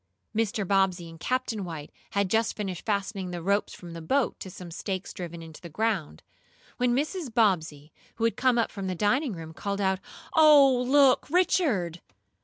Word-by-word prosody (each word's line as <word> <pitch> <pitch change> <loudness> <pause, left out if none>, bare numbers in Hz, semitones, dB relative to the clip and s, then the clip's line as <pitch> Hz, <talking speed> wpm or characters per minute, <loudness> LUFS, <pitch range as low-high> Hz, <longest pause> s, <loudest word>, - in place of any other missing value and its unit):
Mr. 215 -3 0
Bobbsey 190 -3 +2
and 165 0 -12
Captain 250 -1 -1
White 160 -4 -7 0.2
had 200 -1 +2
just 225 +3 +1
finished 195 -3 -5
fastening 200 -2 -1
the 175 -1 -4
ropes 200 +4 0
from 175 -2 -10
the 165 - -7
boat 265 - 0
to 190 - -7
some 180 -2 -10
stakes 185 +2 -4
driven 170 -2 -7
into 160 -2 -12
the 170 - -9
ground, 180 - -2 0.5
when 245 -1 +2
Mrs. 300 0 -2
Bobbsey, 165 - +1 0.2
who 225 - -4
had 230 - +2
come 255 -1 +2
up 230 - +1
from 195 -2 -5
the 185 - -2
dining 240 - +1
room, 160 -2 -8
called 200 +4 -3
out: 190 -1 +1 0.3
"Oh, 280 -5 +6
look, 275 -1 +4
Richard!" 255 - +1
200 Hz, 180 wpm, -27 LUFS, 175-240 Hz, 0.5 s, Oh